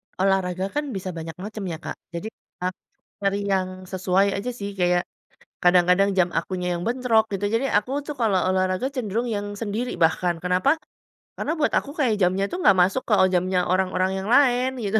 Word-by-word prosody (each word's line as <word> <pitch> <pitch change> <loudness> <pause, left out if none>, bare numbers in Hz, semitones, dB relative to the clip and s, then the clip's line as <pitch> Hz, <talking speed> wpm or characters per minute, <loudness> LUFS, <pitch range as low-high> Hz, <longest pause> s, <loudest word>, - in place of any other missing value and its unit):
Olahraga 190 -1 +1
kan 295 - +1
bisa 185 0 -4
banyak 165 0 -6
macam 210 +2 -7
ya, 160 - -4
Kak. - - -5 0.2
Jadi, 200 +6 -4 0.4
aku 185 0 -3 0.4
cari 200 0 +1
yang 190 -1 +1 0.2
sesuai 190 +1 +2
aja 235 +5 -3
sih, 200 -3 -5
kaya 175 0 +2 0.6
kadang-kadang 180 +2 +4
jam 180 -1 +4
akunya 180 +2 -2
yang - - -5
bentrok 235 -2 +2
gitu, 195 +1 -2
jadi 260 +4 +1
aku 210 +5 -5 0.2
tuh 295 - -4
kalau 205 -5 +3
olahraga 185 +5 0
cenderung 235 0 -2
yang 205 -1 -2
sendiri 225 +3 -3
bahkan, 170 +1 +1
kenapa? 180 - +2 0.6
Karena 310 - -2
buat 305 - +1
aku 280 - 0
kayak 245 -7 +2
jamnya 185 +2 +2
tuh 365 - -3
enggak 200 - +5
masuk 195 +8 +1
ke 210 - +4 0.2
jamnya 180 0 +1
orang-orang 185 0 +1
yang 195 - -5
lain 255 0 +3
gitu. 210 +2 +1
195 Hz, 180 wpm, -24 LUFS, 180-230 Hz, 0.6 s, enggak